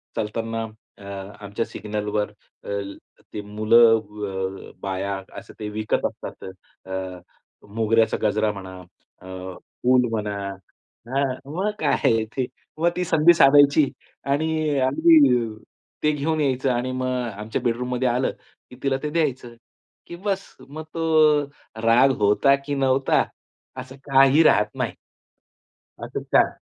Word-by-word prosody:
चालताना 115 +1 -3 0.4
अआमच्या 100 +2 -6
सिग्नलवर 105 0 -3 0.3
अ, - - -9 0.6
ते 105 - -4
मुलं 110 +2 +4
अ, 100 -3 -6
बाया 95 0 -3 0.2
असं - - -15
ते 105 -1 -4
विकत 110 +1 -1
असतात. - - -6 0.4
अ, 95 -1 -5 0.6
मोगऱ्याचा 115 0 +2
गजरा 105 0 +2
म्हणा 95 -2 -9 0.4
अ, - - -15 0.6
फुल 125 0 +4
म्हणा. 105 -2 -2 0.7
हां. 135 +2 +1 0.3
मग 195 +4 0
काय 150 - +1
आहे. 115 -1 +2
ते 125 +4 -3 0.3
मग 170 +2 +3
ती 180 - 0
संधी 165 +1 +5
साधायची 145 -1 +6 0.4
आणि 155 0 0
अ 130 - +2
अगदी 140 -4 +5 0.6
ते 150 - +4
घेऊन 155 +2 -1
यायचं 135 -2 +1
आणि 125 +1 -1
मग 130 0 -2 0.3
आमच्या 105 +1 -4
बेडरूममध्ये 125 +2 -1
आलं 125 +2 0 0.4
की - - -12
तिला 135 -1 +1
ते 150 - -1
द्यायचं. 130 -7 -1 0.5
की 170 - -8
बस 195 +1 -4
मग 155 +2 -7
तो 155 -2 +4 0.4
राग 120 +4 +5
होता 105 +7 +4
की 145 0 -2
नव्हता 135 0 +2 0.6
असं 130 +1 -9
काही 135 +3 +5
राहत 105 -8 +3
नाही. - - -2 1.1
असं - - -5
छान. - - +5
125 Hz, 130 wpm, -23 LUFS, 105-145 Hz, 1.1 s, साधायची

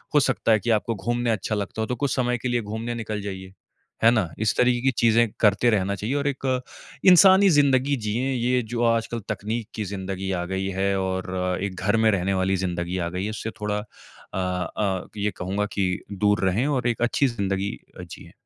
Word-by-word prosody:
हो - - +8
सकता 130 -4 +1
है 110 - +5
कि 120 - -4
आपको 110 +1 +1
घूमने 120 +4 -1
अच्छा 110 0 -1
लगता 105 +2 -3
हो - - 0
तो 125 - -2
कुछ 135 +1 -1
समय 125 -1 +1
के 125 - -4
लिए 120 -1 +1
घूमने 110 +3 -4
निकल 110 -2 -4
जाइए। 95 -2 -7 0.5
है 115 - +7
ना? 110 -8 +1
इस 110 0 +1
तरीके 125 -1 +3
की 135 +1 +2
चीज़ें 115 0 +4
करते 105 +3 +4
रहना 100 -3 +1
चाहिए 110 +7 -3
और 145 0 0
एक 130 -2 -1 0.4
इंसानी 190 +2 +7
ज़िंदगी 140 -3 +3
जिएँ, 120 +4 -1
ये 125 +1 +1
जो 120 +1 -3
आजकल 115 0 0
तकनीक 110 +2 -3
की 110 - -2
ज़िंदगी 95 0 -4
आ 90 -2 -1
गई 95 +1 -2
है 100 0 +1
और 95 -1 -2
एक 100 -2 -3
घर 105 +4 +1
में 110 0 +4
रहने 95 -1 0
वाली 95 0 +1
ज़िंदगी 90 -1 -2
आ 85 -2 -2
गई 90 +2 -4
है, - - -2
उससे 110 +1 -5
थोड़ा 105 0 -1 0.6
अ - - -3
अ, 95 +1 -2
ये 105 0 0
कहूँगा 95 +3 -2
कि 90 -2 0
दूर 105 +1 +1
रहे 95 +7 +1
और 130 -4 0
एक 120 -1 -1
अच्छी 120 +3 +2
ज़िंदगी 100 -4 -2 0.2
अ, - - -6
जिएँ। - - -11
110 Hz, 210 wpm, -24 LUFS, 95-120 Hz, 0.6 s, हो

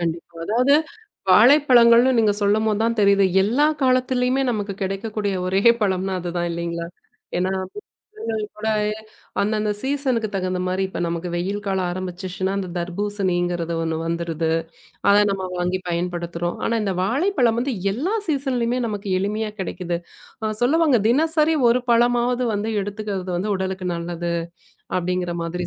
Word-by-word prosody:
கண்டிப்பா. 170 0 -4
அதாவது 250 +8 +3 0.6
வாழைப்பழங்கள்னு 245 +2 +6
நீங்க 215 -2 +3
சொல்லும்போது 210 +1 +2
தான் 230 0 0
தெரியுது. 200 -1 +5 0.2
எல்லா 265 +9 +3 0.2
காலத்திலேயுமே 255 +1 +2
நமக்குக் 200 -3 -4
கிடைக்கக்கூடிய 205 +1 -2
ஒரே 195 +2 +1 0.2
பழம்னா 190 -1 0
அது 175 - -4
தான் 175 0 0
இல்லீங்களா? 170 0 -4 0.5
ஏன்னா 185 +1 0 0.7
அந்தந்த 225 - -3 0.2
போலவே 215 -1 0 0.9
சீசன்க்கு 265 -5 0
தகுந்த 185 -1 -1
மாரி 185 +1 0
இப்ப - - -6
நமக்கு 170 +1 -3
வெயில் 195 +4 -2
காலம் 190 -2 0
ஆரம்பிச்சுடுச்சுன்னா 185 +1 -4
அந்தத் 185 -3 -4
தர்பூசணிங்கிறது 175 -2 -1
ஒண்ணு 160 -1 -2
வந்துருது. 165 -1 -2 0.6
அதை 205 +1 +6
நாம 190 -1 -3
வாங்கி 180 +1 -1
பயன்படுத்துறோம். 175 0 -3
ஆனா 230 - +1
இந்த 195 -2 -1
வாழைப்பழம் 250 - +1
வந்து 265 0 -1 0.2
எல்லா 315 - -2
சீசன்லையுமே 255 -4 0
நமக்கு 205 -2 -5
எளிமையா 210 +2 -2
கிடைக்குது. 175 -1 -3 0.7
சொல்லுவாங்க 290 -2 +4
தினசரி 315 +3 +3
ஒரு 245 +2 +3
பழமாவது 245 +1 +2
வந்து 210 +2 -2
எடுத்துக்கிறது 200 -2 -3
உடலுக்கு 190 -1 -3
நல்லது 170 0 -3 0.7
அப்படிங்கிற 180 -1 -2
மாதிரி 175 +1 -3
200 Hz, 125 wpm, -22 LUFS, 180-235 Hz, 0.9 s, வாழைப்பழங்கள்னு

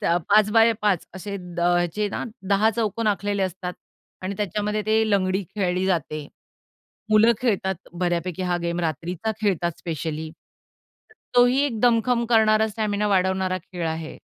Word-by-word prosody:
त्या 170 - +2
5x5 210 -2 +3
असे 195 +2 -7 0.3
अ, 175 0 +3
जे 210 -1 0
ना - - -4 0.2
10 205 +3 +4
चौकोन 225 0 -1
आखलेले 205 -1 0
असतात 185 0 -3 0.5
आणि 190 +2 -3
त्याच्यामध्ये 210 +2 -1
ते 220 0 +2
लंगडी 190 -1 +1
खेळली 185 -2 0
जाते. 155 -5 -1 0.8
मुलं 215 +2 +6
खेळतात 190 -6 -1
बऱ्यापैकी 175 +1 -1
हा 180 -1 0
गेम 170 0 -1
रात्रीचा 170 +6 -2
खेळतात 175 -5 0
स्पेशली, 160 -1 -4
तर 440 - -29 0.2
तोही 245 +2 +5
एक 230 -6 -4
दमखम 235 0 +3
करणारा, 220 -1 +4
स्टॅमिना 210 -1 -1
वाढवणारा 190 -1 +1
खेळ 175 -1 -6
आहे. 160 0 -5
195 Hz, 140 wpm, -24 LUFS, 175-215 Hz, 0.8 s, मुलं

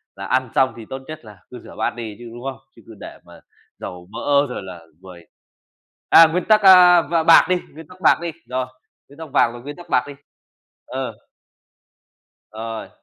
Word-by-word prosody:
là 100 - -8
ăn 130 +2 -1
xong 130 -1 +2
thì 115 - -10
tốt 135 - -6
nhất 155 -6 -10
là 105 -3 -14
cứ - - -9
rửa - - -14
bát - - -2
đi 110 -3 -7
chứ, 120 -1 -10
đúng 120 +1 -11
không? 135 -1 -5 0.2
Chứ - - -18
cứ - - -13
để - - -10
mà - - -16 0.4
dầu 90 0 -9
mỡ 140 +5 +1
rồi 125 - -6
là 90 -3 -11 0.2
ruồi. 90 -3 -14 0.8
À, 165 - +8
nguyên 180 - -1
tắc, 215 -1 +3
a, 180 -2 +7
và 165 +2 -1
bạc 165 - +7
đi, 185 - +2 0.2
nguyên 160 +1 -12
tắc 180 0 -17
bạc - - +4
đi. 170 -1 -4 0.2
Rồi. 130 0 -3 0.4
Nguyên 140 +3 -18
tắc 160 -2 -9
vàng 120 -4 +2
rồi, 120 0 -11
nguyên 145 +2 -9
tắc 175 - -14
bạc 125 - +2
đi. 145 - -9 0.7
Ờ. - - -5 1.4
Rồi. 110 +1 -7
130 Hz, 205 wpm, -20 LUFS, 115-165 Hz, 1.4 s, À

